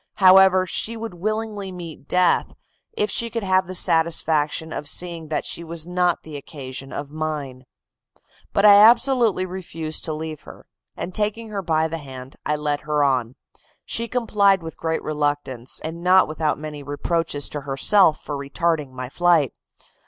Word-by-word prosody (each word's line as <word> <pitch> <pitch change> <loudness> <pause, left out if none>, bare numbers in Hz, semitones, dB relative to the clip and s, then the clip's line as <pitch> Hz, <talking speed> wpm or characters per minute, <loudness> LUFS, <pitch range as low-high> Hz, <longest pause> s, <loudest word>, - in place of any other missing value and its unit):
However, 190 -1 +6
she 225 +5 -1
would 225 -3 -6
willingly 210 +1 -3
meet 170 -5 -9
death, 180 -1 +2 0.4
if 430 -2 0
she 235 -2 0
could 230 -1 -4
have 185 -1 +2
the 185 - -4
satisfaction 160 -2 +1
of 145 - -4
seeing 170 -1 -2
that 155 - -2
she 170 - -4
was 165 -1 -5
not 180 -1 0
the 155 -2 -8
occasion 135 -2 -8
of 145 0 -6
mine. 150 -5 -5 0.9
But 200 - +2
I 205 -1 +9
absolutely 230 -2 +5
refused 165 -4 -4
to 155 - -2
leave 155 -1 -6
her, - - -14 0.3
and 185 - -5
taking 215 +2 -1
her 205 -2 -3
by 160 -2 +1
the 165 +1 -5
hand, 130 -2 -10
I 150 - +1
led 150 -1 -2
her 150 -1 0
on; 130 -3 0 0.5
she 230 +1 -1
complied 205 -6 +2
with 160 - -7
great 160 0 -2
reluctance, 145 -5 -2
and 160 +2 -6
not 185 +1 +5
without 155 0 -1
many 150 -1 -7
reproaches 145 +1 -1
to 145 - -5
herself 150 +5 +3
for 150 - -5
retarding 150 +1 -1
my 130 0 -5
flight. 165 -2 +2
165 Hz, 165 wpm, -22 LUFS, 150-190 Hz, 0.9 s, I